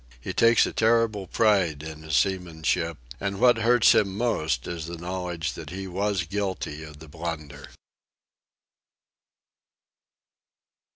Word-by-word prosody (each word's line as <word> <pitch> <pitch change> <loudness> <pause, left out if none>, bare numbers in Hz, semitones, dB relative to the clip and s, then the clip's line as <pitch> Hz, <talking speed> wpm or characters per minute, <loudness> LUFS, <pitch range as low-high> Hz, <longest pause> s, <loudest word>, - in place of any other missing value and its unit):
He - - -5
takes 115 0 +5
a - - -4
terrible 110 -3 +2
pride 95 -9 +2
in 80 -1 -8
his 80 -1 -2
seamanship, 85 -3 0 0.2
and 100 0 -3
what 120 0 +5
hurts 115 0 +5
him 100 -1 +1
most 80 - 0
is 85 -2 -5
the 85 0 -6
knowledge 85 -3 -4
that - - -8
he 95 +2 -6
was 95 0 -1
guilty 95 -4 -3
of 75 -1 -11
the 80 +2 -13
blunder. 75 -3 -6
90 Hz, 125 wpm, -26 LUFS, 80-105 Hz, 0.2 s, takes